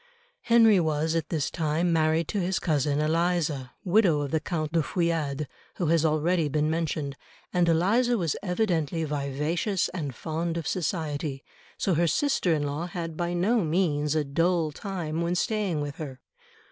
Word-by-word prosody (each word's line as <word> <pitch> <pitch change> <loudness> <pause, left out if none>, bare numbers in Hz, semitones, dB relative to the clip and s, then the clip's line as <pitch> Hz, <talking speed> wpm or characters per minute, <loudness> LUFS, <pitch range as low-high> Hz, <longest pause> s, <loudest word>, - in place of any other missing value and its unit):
Henry 225 -4 +5
was 160 -1 0
at 165 -2 -1
this 155 -5 -1
time 165 +1 0
married 160 0 +2
to 205 - -1
his 185 +1 0
cousin 145 -2 +1
Eliza, 155 -4 0
widow 180 -5 +3
of 140 -2 -3
the 160 - +2
Count 155 -2 -3
de 165 0 +2
Feuillade, 155 -4 -1 0.3
who 175 - -1
has 165 -1 +3
already 160 +1 +2
been 150 +1 +1
mentioned, 155 -3 -2 0.4
and 175 -2 +3
Eliza 225 +9 +3
was 170 -7 0
evidently 175 -5 0
vivacious 150 +6 -1
and 150 -8 -5
fond 165 +3 -3
of 165 - -4
society, 155 -5 -2 0.3
so 190 - +1
her 170 +2 +2
sister 235 - +1
in 155 -2 +1
law 145 +4 -3
had 170 -3 -5
by 175 +1 -2
no 210 +5 +2
means 155 -3 +1
a 155 - +2
dull 165 +3 +1
time 170 -2 -4
when 170 +1 0
staying 200 -6 0
with 145 -1 -5
her. 135 -4 -7
165 Hz, 165 wpm, -27 LUFS, 150-180 Hz, 0.4 s, Henry